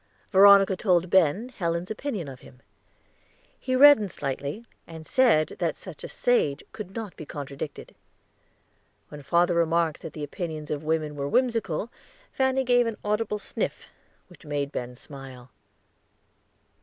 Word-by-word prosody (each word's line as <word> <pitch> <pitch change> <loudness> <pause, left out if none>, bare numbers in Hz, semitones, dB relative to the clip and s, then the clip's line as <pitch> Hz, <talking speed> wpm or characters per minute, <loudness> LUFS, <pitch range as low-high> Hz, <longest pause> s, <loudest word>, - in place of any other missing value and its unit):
Veronica 195 0 +7
told 180 -3 +1
Ben 190 - +3
Helen's 170 -5 -3
opinion 215 - -4
of 130 -2 -9
him; 125 -1 -17 1.0
he 255 0 -1
reddened 265 -8 +7
slightly, 140 - -4 0.2
and 160 -1 -10
said 240 - +3
that 170 -4 -1
such 180 -6 -11
a - - -5
sage 150 - 0
could 210 -3 -9
not 220 -5 -6
be - - -8
contradicted. 140 0 -7 1.2
When 150 -1 -9
father 170 +5 +2
remarked 165 -1 +1
that 160 -2 -8
the 150 - -6
opinions 155 0 -5
of 150 0 -3
women 155 -1 -1
were 140 0 -3
whimsical, 230 - 0 0.4
Fanny 265 0 +1
gave 245 -1 +3
an 225 - -4
audible 210 0 0
sniff, - - -4 0.4
which 180 - -18
made 145 -2 -3
Ben 125 -2 -5
smile. 130 -2 -12
170 Hz, 140 wpm, -26 LUFS, 150-215 Hz, 1.2 s, Veronica